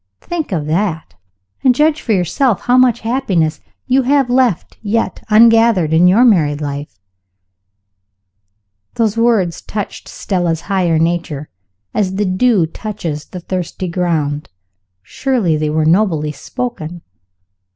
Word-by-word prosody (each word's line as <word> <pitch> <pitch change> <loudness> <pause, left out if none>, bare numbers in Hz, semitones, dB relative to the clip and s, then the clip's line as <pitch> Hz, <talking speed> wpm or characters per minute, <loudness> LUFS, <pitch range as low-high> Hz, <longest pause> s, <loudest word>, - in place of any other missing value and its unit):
Think 335 -7 -4
of 160 -5 -2
that, 160 +1 -2 0.5
and 255 -2 +4
judge 305 +2 +2
for 230 - -3
yourself 200 - +1
how 250 - +2
much 255 -2 +4
happiness 195 -10 -1 0.2
you 260 +1 +2
may 250 - -6
have 275 -3 +2
left 245 -8 0
yet 225 +2 -2
ungathered 225 -6 +5
in 170 +3 +5
your 215 +8 +5
married 155 -10 +3
life." 145 - -6 2.0
(Those 220 -2 +1
words 230 -7 +1
touched 205 -2 -6
Stella's 175 -4 -2
higher 180 -4 0
nature, 165 -3 -2 0.4
as 190 -3 -1
the 205 +1 0
dew 190 0 +2
touches 165 -4 -6
the 180 - -9
thirsty 185 +1 -4
ground. 160 -5 -2 0.5
Surely 230 - 0
they 155 0 -1
were 155 +1 0
nobly 160 -4 +2
spoken! 175 - -6
185 Hz, 130 wpm, -16 LUFS, 160-230 Hz, 2.0 s, ungathered